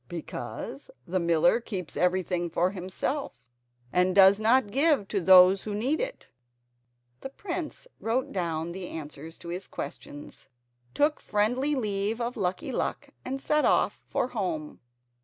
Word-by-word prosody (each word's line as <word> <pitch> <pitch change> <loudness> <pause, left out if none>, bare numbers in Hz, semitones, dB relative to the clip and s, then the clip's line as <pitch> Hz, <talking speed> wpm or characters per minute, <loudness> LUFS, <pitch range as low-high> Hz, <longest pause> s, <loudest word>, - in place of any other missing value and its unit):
"Because 135 -5 -6 0.2
the 185 +2 -1
miller 170 +4 +3
keeps 185 -10 -6
everything 180 -1 0
for 175 +2 +1
himself, 195 +9 -3 0.6
and 180 +1 +2
does 195 +1 +7
not 225 0 +3
give 280 -5 +3
to 200 - 0
those 185 +1 +7
who 210 -1 -4
need 260 +9 0
it." - - -5 0.9
The 270 - -7
prince 345 - -6
wrote 240 +3 -1
down 170 -2 -2
the 180 0 -6
answers 155 +1 -8
to 170 - -10
his 180 +2 -5
questions, 145 0 -9 0.5
took 295 +1 +2
a - - -21
friendly 245 +8 +1
leave 210 -2 -1
of 240 +1 -2
Lucky 185 -3 -2
Luck, - - -3
and 270 +1 -4
set 300 +2 +1
off - - +2
for 250 - -1
home. 175 -10 -3
195 Hz, 145 wpm, -28 LUFS, 175-245 Hz, 0.9 s, does